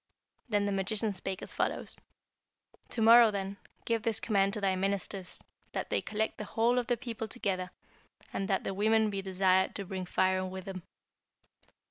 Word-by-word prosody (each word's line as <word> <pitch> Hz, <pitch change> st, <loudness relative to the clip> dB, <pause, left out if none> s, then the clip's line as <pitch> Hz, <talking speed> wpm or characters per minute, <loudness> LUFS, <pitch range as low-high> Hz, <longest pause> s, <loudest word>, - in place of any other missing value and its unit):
Then 205 Hz, -2 st, +2 dB
the 205 Hz, -, 0 dB
magician 205 Hz, +2 st, 0 dB
spake 190 Hz, 0 st, -4 dB
as -, -, -8 dB
follows: -, -, -2 dB, 0.9 s
'To 225 Hz, -, +1 dB
morrow, 230 Hz, 0 st, +8 dB
then, 200 Hz, -1 st, -4 dB, 0.3 s
give 230 Hz, -1 st, +1 dB
this 225 Hz, 0 st, 0 dB
command 200 Hz, -3 st, +2 dB
to 215 Hz, -, -1 dB
thy 195 Hz, -2 st, +1 dB
ministers, 195 Hz, -1 st, -2 dB, 0.3 s
that -, -, -3 dB
they -, -, +2 dB
collect 220 Hz, +1 st, -2 dB
the -, -, -3 dB
whole 235 Hz, +4 st, +2 dB
of 240 Hz, -, -3 dB
the 245 Hz, -, +1 dB
people 230 Hz, -2 st, -5 dB
together, 190 Hz, -5 st, -2 dB, 0.6 s
and 195 Hz, -, -2 dB
that 190 Hz, -, 0 dB
the -, -, -2 dB
women 215 Hz, +2 st, +3 dB
be 195 Hz, -1 st, -2 dB
desired 190 Hz, 0 st, +2 dB
to 200 Hz, -, -4 dB
bring 185 Hz, -1 st, -5 dB
firing 185 Hz, +1 st, +1 dB
with 190 Hz, 0 st, -7 dB
them.' 190 Hz, -2 st, -6 dB
200 Hz, 175 wpm, -31 LUFS, 190-220 Hz, 0.9 s, morrow